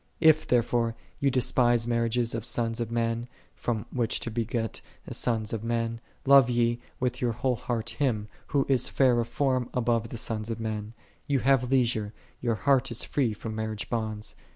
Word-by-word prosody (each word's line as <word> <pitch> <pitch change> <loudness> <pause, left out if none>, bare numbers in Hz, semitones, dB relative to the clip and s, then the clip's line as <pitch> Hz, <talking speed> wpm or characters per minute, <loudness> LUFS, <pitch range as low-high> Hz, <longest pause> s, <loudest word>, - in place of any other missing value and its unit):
55. 160 - +7
If, 155 - +3
therefore, 120 -1 +2 0.2
ye 140 - +3
despise 120 -2 +3
marriages 115 0 +1
of 115 -1 -3
sons 115 -1 -1
of 115 -2 -2
men, 115 0 -1 0.3
from 110 -4 -2
which 120 -3 0
to 115 - -4
beget 115 0 -2 0.3
sons 110 -3 0
of 110 -1 -3
men, 115 0 -1 0.2
love 135 -2 +7
ye 120 -1 +2 0.2
with 125 0 -1
your 120 -2 +1
whole 125 +2 0
heart 115 0 -3
Him, 115 -8 0 0.2
Who 140 -2 +1
is 130 -3 +3
fair 125 -3 +3
of 115 - -1
form 130 0 0
above 115 -2 +1
the 120 - -5
sons 110 -1 -2
of 115 - -3
men; 110 0 -4 0.3
ye 140 -2 +2
have 130 -1 +3
leisure; 115 -5 +1 0.3
your 120 -2 0
heart 135 +1 +2
is 120 0 -2
free 130 -6 0
from 110 +1 -6
marriage 110 -1 -4
bonds. 110 -2 -3
120 Hz, 180 wpm, -28 LUFS, 115-125 Hz, 0.3 s, 55